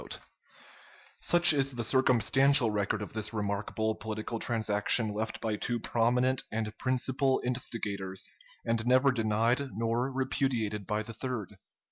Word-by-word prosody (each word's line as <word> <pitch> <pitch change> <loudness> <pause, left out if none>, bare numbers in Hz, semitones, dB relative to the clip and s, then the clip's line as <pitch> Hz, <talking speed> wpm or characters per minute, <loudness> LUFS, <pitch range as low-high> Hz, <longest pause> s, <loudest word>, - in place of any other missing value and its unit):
] - - -23 0.3
Such 175 -2 +6
is 135 -2 +1
the 120 -1 -3
circumstantial 130 +1 +4
record 105 +1 -1
of - - -9
this 110 0 -3
remarkable 105 +1 -2
political 110 +1 -5
transaction 110 0 +1
left 110 +2 -4
by 110 -2 -2
two 120 +2 -2
prominent 125 +3 +1
and 110 -1 -3
principal 130 +1 0
instigators, 105 -6 -3 0.4
and 115 -1 0
never 130 +2 +4
denied 115 +3 0
nor 115 +3 -1
repudiated 125 -6 -2
by 105 0 -1
the 115 - -8
third. 110 -4 -5
115 Hz, 130 wpm, -29 LUFS, 110-130 Hz, 0.4 s, Such